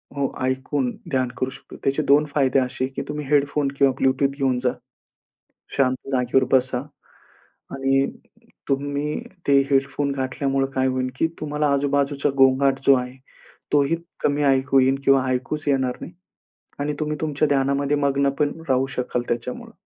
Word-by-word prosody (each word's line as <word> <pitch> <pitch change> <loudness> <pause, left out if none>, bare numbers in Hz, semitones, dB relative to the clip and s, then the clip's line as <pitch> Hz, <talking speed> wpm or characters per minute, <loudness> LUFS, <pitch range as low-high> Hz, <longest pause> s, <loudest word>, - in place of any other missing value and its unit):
हो, 140 -1 -1
ऐकून 130 0 -1 0.2
ध्यान 130 -2 +1
करू 130 - -1
शकतो. - - -13
त्याचे 140 +3 +1
2 145 +2 +4
फायदे 135 -2 +3
असे 125 0 -2
आहे 135 - -8
की - - -2
तुम्ही 150 0 -4
हेडफोन 145 0 +2
किंवा 135 -2 +4
ब्लूटूथ 135 +1 +3
घेऊन 130 -3 +1
जा. 125 - +2 1.1
शांत 130 -1 0
जागेवर 130 +1 +2
बसा 130 -1 +2 0.9
आणि 135 0 +2 0.6
तुम्ही 145 +2 -1 0.3
ते 140 -1 +6
हेडफोन 140 +1 +1
घातल्यामुळे 135 0 -1
काय 130 0 +1
होईल 130 0 -1
की 165 - +2
तुम्हाला 150 0 -1
आजूबाजूचा 140 0 +1
गोंगाट 135 0 +4
जो 140 - +8
आहे, 125 +1 -4 0.6
तोही 145 +3 +3 0.2
कमी 145 0 +1
ऐकू 135 0 +3
येईल 130 +1 +3
किंवा 135 -1 +4
ऐकूच 130 +4 -2
येणार 130 -2 +1
नाही. 170 - -8 0.7
आणि 150 +1 -1
तुम्ही 150 0 -1
तुमच्या 150 -1 +1
ध्यानामध्ये 140 +1 +1
मग्न 140 -1 +2
पण 145 -1 +2 0.2
राहू 130 0 +2
शकाल 125 -1 -1
त्याच्यामुळं. 120 +1 -4
135 Hz, 150 wpm, -23 LUFS, 130-145 Hz, 1.1 s, जो